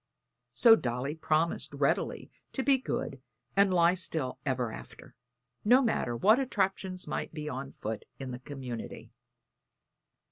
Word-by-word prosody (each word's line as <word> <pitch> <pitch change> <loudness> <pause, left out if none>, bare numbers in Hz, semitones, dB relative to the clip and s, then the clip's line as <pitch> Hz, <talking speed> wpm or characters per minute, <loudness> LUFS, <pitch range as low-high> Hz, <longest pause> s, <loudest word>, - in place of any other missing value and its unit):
So 230 -2 +7
Dolly 125 - -2
promised 160 +1 0
quite - - -9
readily - - 0 0.2
to 265 - -1
be 270 -1 +4
good 135 - -4 0.3
and 200 -1 +5
lie 175 -1 +5
still 160 -7 -3
ever 125 -4 0
after, - - -11 0.5
no 245 +5 +6
matter 125 - 0
what 215 - +5
attractions 190 -7 -1
might - - -4
be 150 -1 -5
on 135 -1 -5
foot 110 0 -5
in 130 -1 -6
the 125 - -6
community. 130 -4 -7
155 Hz, 140 wpm, -30 LUFS, 130-195 Hz, 0.5 s, So